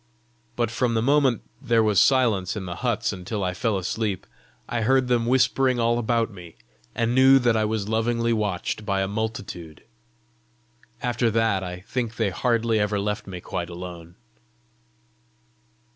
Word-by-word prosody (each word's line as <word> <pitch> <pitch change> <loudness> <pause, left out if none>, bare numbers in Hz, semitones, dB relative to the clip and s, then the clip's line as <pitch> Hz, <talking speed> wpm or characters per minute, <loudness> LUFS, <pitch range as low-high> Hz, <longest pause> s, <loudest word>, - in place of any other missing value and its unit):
But 120 -2 0
from 115 0 0
the 110 - +2
moment 135 -2 +3 0.2
there 115 -1 +3
was 105 -3 +4
silence 115 -9 +2
in 100 -3 -5
the 85 -1 -6
huts 115 -4 -1
until 95 +2 -4
I 90 -1 -1
fell 105 +2 0
asleep, 95 +1 -2 0.4
I 120 - -2
heard 130 +3 +3
them 120 -2 +1
whispering 130 0 +2
all 120 +1 +2
about 115 -1 0
me, 90 -4 -12 0.4
and 115 0 0
knew 130 +1 +7
that 120 -3 +2
I 110 -1 +2
was 105 -2 -2
lovingly 115 +1 +1
watched 105 -1 -2
by 100 -2 0
a - - -1
multitude. 100 -6 -5 1.2
After 120 -1 +1
that, 110 -3 +1
I 90 0 -6
think 115 +2 -3
they 110 -4 0
hardly 115 +2 +1
ever 105 0 0
left 105 0 -3
me 90 -2 -7
quite 85 0 -4
alone. 85 -1 -9
110 Hz, 160 wpm, -24 LUFS, 95-120 Hz, 1.2 s, knew